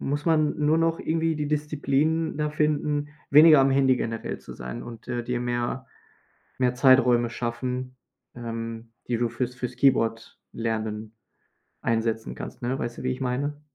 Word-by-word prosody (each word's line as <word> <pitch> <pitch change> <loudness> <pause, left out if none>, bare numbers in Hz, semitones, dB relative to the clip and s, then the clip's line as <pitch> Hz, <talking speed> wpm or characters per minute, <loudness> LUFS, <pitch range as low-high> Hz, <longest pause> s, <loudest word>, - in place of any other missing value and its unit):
muss 145 +1 -2
man 155 -2 +2
nur 150 +2 +3
noch 165 0 +1
irgendwie 165 0 0
die 150 -1 -2
Disziplin 150 +1 0
da 150 0 0
finden, 150 -1 0 0.2
weniger 150 0 +8
am 135 0 +4
Handy 135 -1 +4
generell 115 -2 -4
zu - - -11
sein 60 0 -7
und, 120 +1 -10
äh, 120 -1 -2
dir 120 0 -2
mehr 120 +1 -2 0.7
mehr 125 -1 +2
Zeiträume 125 -2 +5
schaffen, 125 +2 -4 0.4
ähm, 115 -1 -6 0.2
die 120 - 0
du 120 0 0
fürs 125 +1 -3
fürs 125 0 -5
Keyboard 115 -4 +1
lernen 110 -1 -3 0.7
einsetzen 115 -1 -1
kannst, - - -8
ne? 125 +3 -2
Weißt 120 0 -4
du, - - -7
wie 130 - 0
ich 130 - -5
meine? 140 +4 -2
125 Hz, 160 wpm, -26 LUFS, 120-145 Hz, 0.7 s, weniger